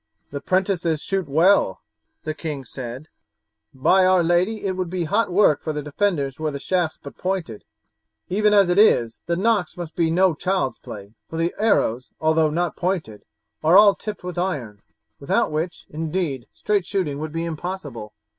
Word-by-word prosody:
"The 140 0 -5
'prentices 180 -3 0
shoot 190 -6 -2
well," 165 - +3 0.4
the 155 - -3
king 150 -4 -5
said; 130 +4 -8 0.6
"by 185 +8 +3
our 185 -1 +4
lady, 180 +6 +1
it 195 - +1
would 185 -2 -3
be 180 0 -2
hot 200 +5 0
work 180 -5 +4
for 155 - -3
the 150 -1 -4
defenders 150 -3 -1
were 155 -1 -1
the 140 - -5
shafts 175 +2 -1
but 140 - -12
pointed! 180 - -3 0.6
Even 210 +3 +2
as 200 -2 +5
it 180 +3 +3
is 120 - +4
the 170 - +1
knocks 200 -2 0
must 170 -2 -7
be 165 -2 +1
no 180 +2 +3
child's 180 -3 -1
play, 100 0 -10 0.2
for 165 - -6
the 165 +1 0
arrows, 130 - +1
although 160 0 +3
not 170 +2 -1
pointed, 175 - -3 0.4
are 165 +4 +6
all 205 -1 +8
tipped 210 -1 -7
with 180 -1 -4
iron, 125 - -3 0.4
without - - 0
which, 160 +3 -3
indeed, 155 -5 -3
straight 205 -4 -1
shooting 165 -8 -2
would 155 0 -5
be 165 +1 -3
impossible." 150 - -6
170 Hz, 175 wpm, -22 LUFS, 150-185 Hz, 0.6 s, all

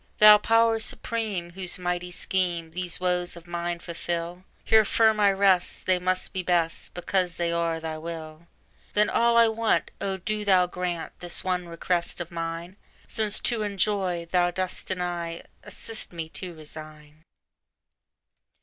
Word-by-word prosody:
Thou 210 0 +9
Power 225 +1 +3
Supreme, 220 -6 -2
whose 185 0 -3
mighty 180 0 -2
scheme 175 -2 -1
These 180 0 -3
woes 180 -1 0
of 170 0 -12
mine 175 0 -3
fulfil, 170 +1 -4 0.2
Here 220 0 +5
firm 220 0 +3
I 200 -1 +5
rest; 195 -2 +2
they 185 -1 +3
must 185 +1 -1
be 185 - -1
best, 170 -2 0
Because 180 0 0
they 170 -1 -1
are 170 -1 0
Thy 160 -1 -5
will! 160 0 -8 0.5
Then 210 0 +4
all 235 0 +3
I 230 0 +7
want—O 220 -3 0
do 210 +3 -3
Thou 190 -3 +5
grant 180 -2 -4
This 175 -1 -2
one 180 -1 -1
request 170 +1 -2
of 175 0 -6
mine!— 165 +2 -5 0.3
Since 215 -2 +2
to 235 -3 +2
enjoy 195 -4 0
Thou 175 -1 +3
dost 185 +1 -3
deny, 175 -2 -3 0.2
Assist 225 -1 -5
me 165 -2 -4
to 180 0 -7
resign. 155 0 -11
180 Hz, 150 wpm, -26 LUFS, 170-195 Hz, 0.5 s, Thou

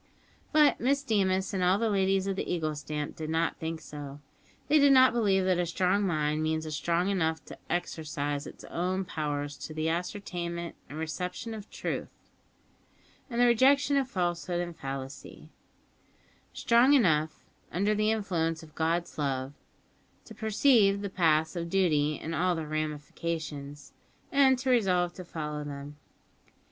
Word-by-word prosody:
But 300 -2 +5
Miss 275 +3 +1
Deemas 195 -5 +1
and 185 -2 0
all 180 +2 +4
the 230 +1 0
ladies 195 -2 +2
of 195 -1 -1
the - - -3
Eagle 160 -3 -1
stamp 150 0 -5
did 155 -1 -5
not 165 +1 0
think 160 0 -4
so. 145 -2 -9 0.5
They 305 - +5
did 280 -1 +6
not 260 -2 +7
believe 195 -5 +2
that 185 -2 +2
a 175 - +1
strong 185 +4 +1
mind 155 -2 0
means 160 0 -1
a - - -5
mind - - -5
strong 170 +5 0
enough 160 -6 -1
to - - -10
exercise 150 -4 -2
its - - -11
own 185 +2 -2
powers 145 -3 -3
to 155 - -7
the 155 +1 0
ascertainment 170 -1 -4
and 145 - -8
reception 180 +8 -4
of 215 -2 -8
truth - - -4 1.2
and 235 -1 -3
the 245 - +6
rejection 270 +4 +4
of 270 -2 +1
falsehood 175 -3 -1
and 175 -1 -4
fallacy; 135 -1 -7 1.0
strong 240 +4 +4
enough, 160 - +2 0.3
under 200 +4 +1
the 215 0 +1
influence 170 -7 -1
of 155 -2 -15
God's 165 +1 -1
love, 135 -1 -2 0.7
to 225 - -11
perceive 215 -2 +3
the 200 - -4
paths 160 -3 +2
of 170 -1 -3
duty 155 -6 +2
in 165 - -5
all 180 +2 +1
their 160 -1 -4
ramifications, 150 -1 -4 0.4
and 270 -2 +5
to 260 +1 0
resolve 180 -7 +2
to 185 - -8
follow 150 -3 -5
them. 145 0 -7
175 Hz, 160 wpm, -29 LUFS, 155-200 Hz, 1.2 s, not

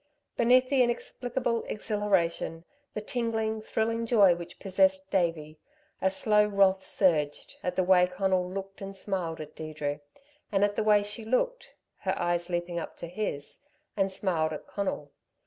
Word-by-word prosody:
Beneath 255 +2 +4
the 270 -2 +4
inexplicable 240 0 -1
exhilaration, 195 -6 -1 0.3
the 215 - -2
tingling, 220 -1 -1
thrilling 225 +1 -1
joy 205 -6 +6
which 170 0 -8
possessed 190 0 +1
Davey, 165 -5 0 0.4
a 190 - +3
slow 210 +2 +3
wrath 195 -2 +3
surged, 155 -7 0
at 180 0 -2
the 185 - +2
way 180 0 +5
Conal 180 0 0
looked 195 +1 -7
and 195 0 -6
smiled 185 -4 -3
at 155 -1 -8
Deirdre, 150 -2 -4 0.5
and 195 -1 +2
at 205 0 +2
the - - +1
way 210 -1 +5
she 205 +2 -5
looked 255 - -1 0.2
her - - -1
eyes 175 0 0
leaping 175 0 -2
up - - -7
to - - -6
his 170 -5 -4 0.4
and 195 -1 +1
smiled 170 -5 0
at 150 - -7
Conal. 185 -8 -3
190 Hz, 155 wpm, -29 LUFS, 175-215 Hz, 0.5 s, joy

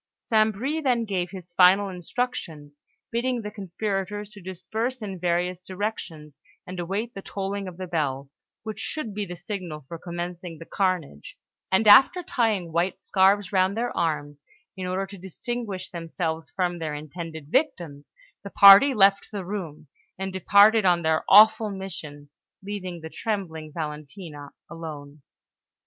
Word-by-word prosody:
St. 220 -1 +2
Bris 275 +10 -3
then 245 -4 +2
gave 185 -4 -2
his 175 -2 -10
final 190 +3 +6
instructions, 175 -7 -5 0.3
bidding 240 0 -1
the 210 - -5
conspirators 200 +1 -4
to 205 -1 -13
disperse 220 +8 -4
in 195 -4 -6
various 175 +1 0
directions 180 -7 -6 0.3
and 185 0 -7
await 200 +7 -3
the 195 - -7
tolling 195 0 -4
of 180 -2 -9
the 185 - -5
bell, 145 -6 -2 0.4
which 220 -1 -6
should 230 -3 -3
be 205 0 -3
the 175 - -6
signal 175 -6 -6
for 165 +2 -8
commencing 175 0 -6
the 165 - -10
carnage; 180 - -2 0.3
and 200 +3 +3
after 270 - +7
tying 215 - 0
white 170 +3 0
scarves 195 0 +3
round 190 +1 +2
their 240 +1 -2
arms, 145 -3 -2 0.3
in 185 -1 -5
order 185 +2 -1
to 195 0 -11
distinguish 190 +1 -5
themselves 165 -1 -4
from 175 -2 -2
their 155 -2 -3
intended 160 0 -8
victims, 170 - -1 0.3
the 200 - -7
party 200 +8 +8
left 195 -1 +4
the 200 -3 -5
room 170 -6 -6 0.3
and 190 0 -4
departed 205 +3 +5
on 175 -2 +3
their 160 0 +1
awful 215 +1 +7
mission, 160 -7 -8 0.3
leaving 185 -4 -6
the 160 - -7
trembling 165 -8 -4
Valentina 150 -1 -7 0.2
alone. 150 -3 -9
185 Hz, 150 wpm, -25 LUFS, 165-205 Hz, 0.4 s, party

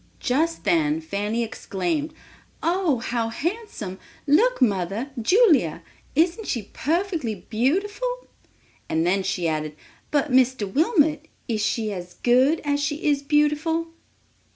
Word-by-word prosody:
Just 320 +6 0
then 310 -2 +2
Fanny 220 -6 -2
exclaimed, 295 - -3 0.5
"Oh, 345 -5 +2
how 230 0 -2
handsome; 280 - -4 0.3
look 435 - +3
mother—Julia, 235 - +2 0.3
isn't 345 +8 +1
she 225 -6 -3
perfectly 320 - -1
beautiful!" 410 - 0 0.6
And 160 +1 +1
then 190 +3 +2
she 185 -3 -1
added, 155 -1 -2 0.3
"But, 290 -1 0
Mr. 255 -3 +3
Wilmot, 315 - +2 0.2
is 220 -3 -1
she 215 0 -1
as 180 -1 -8
good 260 +6 +3
as 285 -1 0
she 290 +1 -2
is 290 -2 +2
beautiful?" 300 +3 +1
285 Hz, 115 wpm, -24 LUFS, 220-325 Hz, 0.6 s, look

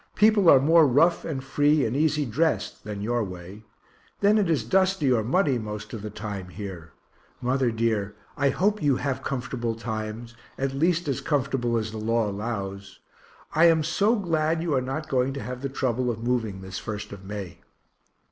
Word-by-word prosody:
People 210 -4 +5
are 135 - +8
more 160 +3 +5
rough 165 +7 +3
and 135 -5 -4
free 145 +2 +2
and 115 +2 -2
easy 150 0 +2
drest 155 +8 -1
than 105 -1 -5
your 120 +1 0
way. 95 +1 -8 0.6
Then 205 +2 +4
it 195 -5 +1
is 160 -4 +1
dusty 190 -7 +2
or 115 -3 +2
muddy 135 - +2
most 105 -1 -7
of 110 - -5
the 105 - -5
time 105 -3 -6
here. 90 -5 -8 0.5
Mother 130 0 +1
dear, 110 -3 -1 0.2
I 140 -1 +2
hope 205 +7 +1
you 145 -3 +3
have 135 0 -2
comfortable 120 -3 -3
times 110 +1 -5 0.2
at 135 0 -1
least 165 +4 +1
as 135 -4 -1
comfortable 135 -5 0
as 110 -1 -2
the 110 - -6
law 115 0 +1
allows. 100 -2 -5 0.6
I 160 +2 +5
am 165 -2 +5
so 200 +8 +2
glad 165 -5 0
you 165 -3 -1
are 130 - +2
not 135 +5 -4
going 130 0 +1
to 140 - -5
have 125 0 -6
the 140 - -2
trouble 130 -2 -1
of 115 -1 -4
moving 115 -6 -1
this 95 0 -6
1st 105 -1 -6
of 100 -1 -9
May. 95 -3 -7
125 Hz, 185 wpm, -25 LUFS, 110-155 Hz, 0.6 s, are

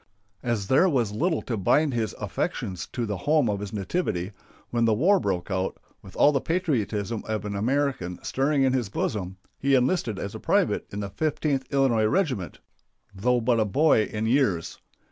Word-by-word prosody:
As 120 -5 -1
there 135 - +4
was 120 - +1
little 160 - 0
to 120 - -3
bind 140 - +2
his 115 -3 -1
affections 90 -2 -3
to 120 - -3
the 105 -3 -3
home 145 - +2
of 100 -2 -1
his 100 -1 -6
nativity, 100 - -2 0.4
when 115 -1 +2
the 110 -1 +3
war 185 - +4
broke 95 - -2
out, 95 0 -1 0.2
with 95 - -14
all 145 - +5
the 135 -3 0
patriotism 115 - -1
of 110 -1 -2
an 100 -1 -3
American 120 -5 -1
stirring 140 +1 +1
in 130 -1 +3
his 125 -6 0
bosom, 95 -2 -3 0.2
he 135 0 +3
enlisted 125 - +1
as 100 - -5
a - - -7
private - - +1
in 100 - -4
the 100 - -4
Fifteenth 150 -2 -1
Illinois 130 -6 +3
Regiment, 125 - -1 0.6
though 120 +6 +1
but 120 0 +2
a - - +4
boy 130 0 +3
in 110 +1 -3
years. 110 - +1
115 Hz, 185 wpm, -26 LUFS, 100-140 Hz, 0.6 s, all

